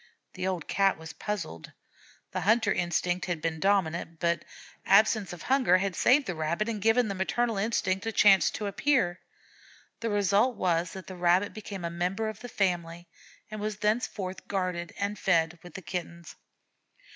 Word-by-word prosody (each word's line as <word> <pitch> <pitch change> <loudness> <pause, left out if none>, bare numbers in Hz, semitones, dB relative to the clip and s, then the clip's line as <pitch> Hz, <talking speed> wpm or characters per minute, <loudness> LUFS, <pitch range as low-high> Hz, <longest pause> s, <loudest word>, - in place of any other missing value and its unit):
The 185 0 -3
old 180 -4 -3
Cat 195 -1 +2
was 160 0 -9
puzzled. 170 - -5 0.6
The - - -3
hunter 220 +2 +3
instinct 175 +1 -1
had 175 -3 -2
been 160 0 -2
dominant, 170 -4 0
but 170 -1 0 0.4
absence 210 0 +4
of 175 -2 -9
hunger 255 -9 +4
had 190 -1 -2
saved 270 +8 +4
the 180 - -3
Rabbit 170 +6 -1
and 220 -3 -3
given 225 +3 +3
the 200 - -2
maternal 220 +4 -1
instinct 200 -1 0
a - - 0
chance 200 -2 +5
to 210 - -5
appear. 200 -4 +1 0.8
The 230 - -2
result 205 +4 +2
was 170 -2 0
that 190 -1 -8
the 185 - -8
Rabbit 180 +3 +2
became 200 -4 -7
a 170 - -3
member 185 +6 -1
of 215 -1 -8
the 245 - -8
family, 175 -4 -2 0.4
and 215 -1 -5
was 210 0 -3
thenceforth 210 -3 -2
guarded 180 -3 -2
and 200 0 -2
fed 170 -2 +1
with 175 - -13
the 190 - -7
Kittens. 170 -2 -6
190 Hz, 170 wpm, -28 LUFS, 175-210 Hz, 0.8 s, chance